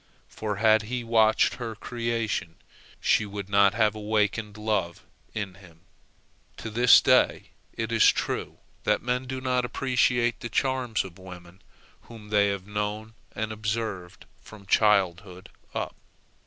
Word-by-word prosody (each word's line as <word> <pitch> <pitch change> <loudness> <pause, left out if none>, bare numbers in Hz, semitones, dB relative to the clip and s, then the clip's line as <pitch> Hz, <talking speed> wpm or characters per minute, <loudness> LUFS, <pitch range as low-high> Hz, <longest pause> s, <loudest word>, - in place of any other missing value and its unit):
For, 105 -2 -4
had 110 +1 +4
he 125 -1 -3
watched 110 -1 +3
her 115 -3 -5
creation, 115 -6 -3 0.4
she - - +2
would 100 -1 -7
not 100 0 +4
have 110 -2 +3
awakened 105 0 -1
love 105 -6 -2 0.3
in 100 -3 -4
him. 90 -4 -18 0.8
To 115 - -7
this 120 +3 +6
day - - +2 0.2
it 115 0 -4
is 115 -2 +5
true - - -4 0.3
that - - +1
men 125 +1 -1
do 130 0 -4
not 125 -1 0
appreciate 125 -2 +1
the 120 - -6
charms 130 -4 0
of 95 0 -12
women 90 0 -12 0.5
whom 110 -3 -12
they 105 -1 +3
have 100 -2 -3
known 105 +2 -4 0.2
and 110 0 -3
observed 105 -4 -4 0.2
from 105 -2 -14
childhood 95 -3 +1 0.3
up. - - -3
110 Hz, 140 wpm, -26 LUFS, 100-115 Hz, 0.8 s, this